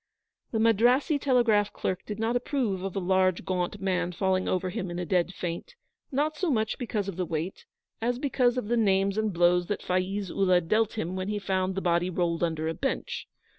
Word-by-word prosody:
The 225 - -2
Madrassee 240 - +3
telegraph 235 -7 +3
clerk 185 0 -3
did 210 - -4
not 225 +2 0
approve 245 -6 -1
of 195 0 -4
a - - +1
large, 185 -1 +2
gaunt 185 +2 -2
man 180 -2 0
falling 185 +1 0
over 185 0 0
him 190 -2 -3
in 175 - -5
a 180 - -2
dead 180 +1 +1
faint, 175 -2 -5 0.4
not 295 +3 0
so 360 +3 -1
much 220 -5 0
because 215 -5 -2
of 195 -3 -5
the 185 - 0
weight, 165 +4 -4 0.4
as 240 +2 0
because 255 -2 +1
of 250 - -2
the 240 +2 +1
names 195 -2 +2
and 215 -1 0
blows 175 0 +3
that 205 - -3
Faiz 185 +1 -1
Ullah 185 -2 +3
dealt 215 +6 +1
him 185 -5 -3
when 185 0 -3
he 210 0 -1
found 190 -2 -1
the 195 - -1
body 175 0 +1
rolled 170 -1 0
under 160 -2 -1
a 165 - -1
bench. 270 +9 -3
195 Hz, 210 wpm, -28 LUFS, 180-225 Hz, 0.4 s, Madrassee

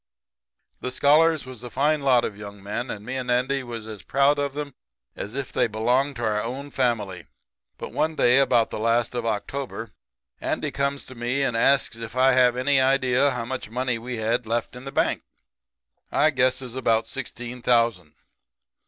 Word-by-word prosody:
"The 125 - -4
scholars 155 +3 +4
was 130 -3 -10
a 125 - -7
fine 145 +4 +1
lot 130 -3 +4
of 105 - -4
young 100 -1 -10
men, 110 +5 -4
and 105 0 -6
me 130 +2 -3
and 125 -1 -4
Andy 125 +3 +1
was 120 -3 -7
as 110 -2 -8
proud 140 +2 +2
of 140 0 -2
'em 145 -2 -4 0.4
as 105 +5 -6
if 140 -2 -4
they - - +2
belonged 125 +6 +1
to 120 - -5
our 105 -1 +1
own 135 +5 -5
family. 105 - -1 0.5
"But - - -7
one 155 +1 0
day 125 -2 +4
about 120 -4 +3
the - - -4
last 115 +2 +1
of 120 -2 -2
October 115 +1 -4 0.5
Andy - - -2
comes 140 0 -1
to 130 - -11
me 120 +3 -1
and 120 - 0
asks 135 0 +3
if 115 +1 -8
I 130 +1 +5
have 125 -1 +4
any 135 +2 +3
idea 130 0 +3
how 125 -3 -3
much 130 -2 -5
money 125 0 -1
we 125 +1 -5
had 115 +2 0
left 115 +1 -2
in 125 +2 -10
the 135 - -5
bank. - - +1 0.9
I 155 - +3
guesses 130 -2 0
about 115 -3 +2
sixteen 125 0 -6
thousand. 115 -10 +2
125 Hz, 190 wpm, -24 LUFS, 115-135 Hz, 0.9 s, I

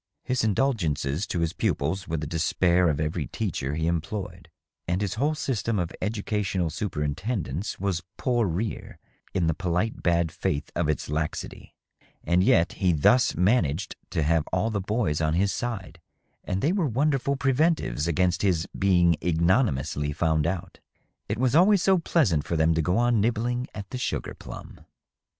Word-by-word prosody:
His 125 -2 0
indulgences 95 - 0
to 85 - -2
his 85 -1 0
pupils 90 +7 -1
were 80 - -2
the 75 - -4
despair 85 +2 +2
of 75 -1 -1
every 75 -1 -2
teacher 70 +3 -3
he 80 +1 -1
employed, 85 +1 -3 0.4
and 90 +2 0
his 100 -1 -1
whole 145 +8 0
system 115 -6 -1
of 90 -2 -1
educa 105 0 -1
tional 95 -5 -1
superintendence 85 - -3
was 95 -3 -1 0.2
pour 120 -4 +1
rire 95 +6 -3 0.4
in 90 -3 +2
the 80 - +2
polite 90 +5 -1
bad 85 -2 +1
faith 75 -1 -2
of 85 -3 0
its 75 - -1
laxity; 75 +1 -4 0.5
and 90 +1 +2
yet 85 -2 +4
he 95 -3 +1
thus 120 - +4
managed 90 - +1
to 80 - 0
have 80 +1 +1
all 105 +5 0
theboys 100 -6 -1
on 75 +1 +1
his 100 +3 +2
side, 95 -8 -5 0.4
and 95 +1 -2
they 150 - +3
were 190 -6 +1
wonderful 140 +2 +1
preventives 135 - +1
against 90 +1 +1
his 90 -5 +1
being 90 -3 +4
ignominiously 80 - +1
found 80 0 +1
out. 90 0 -4 0.5
It 105 - -1
was 130 +1 +1
always 185 +2 +5
so 190 -2 +4
pleasant 110 - +2
for 85 - -3
them 80 +1 +3
to 80 - +1
go 90 +4 +1
on 120 -2 +3
nibbling 120 +3 0
at 100 -2 -7
the 125 - -4
sugar - - -3
plum. - - -10
90 Hz, 165 wpm, -26 LUFS, 80-115 Hz, 0.5 s, always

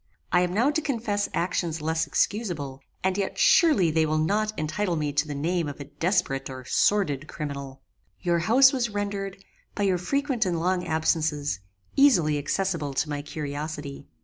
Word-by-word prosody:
I 180 - +4
am 180 -1 0
now 235 +9 +2
to 315 - 0
confess 225 -8 -1
actions 170 -2 -1
less 160 +1 -1
excusable, 150 - -1 0.2
and 190 +1 +1
yet 195 - -2
surely 315 - +5
they 160 0 +3
will 155 0 0
not 210 +7 +1
entitle 175 +4 -1
me 150 -2 -2
to 145 +2 +1
the 145 - -4
name 165 +3 0
of 145 - -8
a - - -5
desperate 145 -2 -1
or 130 -1 -8
sordid 155 -5 +1
criminal. 140 -4 -6 0.4
"Your 175 -2 +1
house 255 +10 +5
was 245 -3 0
rendered, 200 -1 -4 0.3
by 205 - -1
your 185 -3 +2
frequent 275 - 0
and 175 -4 -1
long 180 +1 0
absences, 155 - 0 0.4
easily 175 - +4
accessible 155 -2 -1
to 150 - 0
my 145 -1 -2
curiosity. 150 -1 -6
170 Hz, 170 wpm, -26 LUFS, 150-205 Hz, 0.4 s, surely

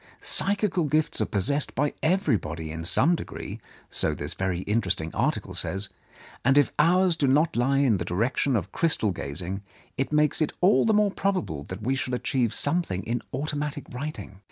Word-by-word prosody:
Psychical 200 -4 +1
gifts 155 +1 +1
are - - +1
possessed 140 +9 0
by 145 +1 +1
everybody 105 - 0
in 80 +1 -5
some 145 - +3
degree, - - -7 0.3
so - - +1
this - - -4
very 95 -2 -2
interesting 90 -7 -1
article - - -1
says, 95 +1 -2 0.5
and 135 +3 +4
if 145 - +4
ours 180 +3 +4
do 145 -3 +1
not 150 +5 +3
lie 130 +3 +2
in 130 -7 +3
the 90 - -2
direction 115 +9 0
of 100 -7 -2
crystal 155 - +1
gazing, 90 +4 -4 0.4
it 135 - 0
makes 150 +1 +2
it 155 - +1
all 185 +3 +4
the 220 - +3
more 210 -1 +3
probable 185 - -2
that 95 +3 -7
we 130 +4 +1
shall 130 -1 -1
achieve 125 -2 0
something 145 - -1
in 120 +3 -2
automatic 145 +1 -3
writing. 125 -7 -6
135 Hz, 175 wpm, -26 LUFS, 95-155 Hz, 0.5 s, and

